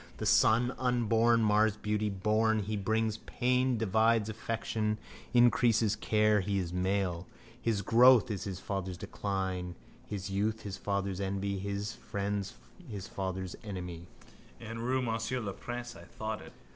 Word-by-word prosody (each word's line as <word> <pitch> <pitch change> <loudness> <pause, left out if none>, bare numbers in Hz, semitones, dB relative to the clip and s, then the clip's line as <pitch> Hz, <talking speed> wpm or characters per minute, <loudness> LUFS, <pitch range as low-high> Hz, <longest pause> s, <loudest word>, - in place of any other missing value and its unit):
The - - -4
son 120 +3 +4
unborn 115 -2 +3
mars 105 0 +3
beauty: 105 0 -1
born, 110 +2 +1
he 105 +2 -3
brings 110 +2 0
pain, 125 +1 +1
divides 110 +1 +2
affection, 110 -1 -2 0.3
increases 115 -3 +4
care. 105 -1 +3
He 100 +1 -1
is 90 -3 -2
a - - -8
new 90 - -1
male: 95 -2 0 0.3
his 110 -4 0
growth 120 +1 +6
is 100 - -3
his 95 -2 -4
father's 95 -3 -4
decline, 95 -3 -3 0.3
his 100 -1 -5
youth 105 +3 -1
his 100 -2 -5
father's 100 -1 -2
envy, 100 0 -2
his 100 +2 -3
friend 100 0 -3 0.4
his 100 -3 -6
father's 95 -1 -4
enemy. 90 -4 -6 0.5
In 115 -1 -7
rue 130 +2 0
Monsieur 115 +2 -1
le 100 -4 -4
Prince 120 +3 -6
I - - -12
thought 110 -2 -5
it. - - -12
105 Hz, 150 wpm, -31 LUFS, 100-115 Hz, 0.5 s, growth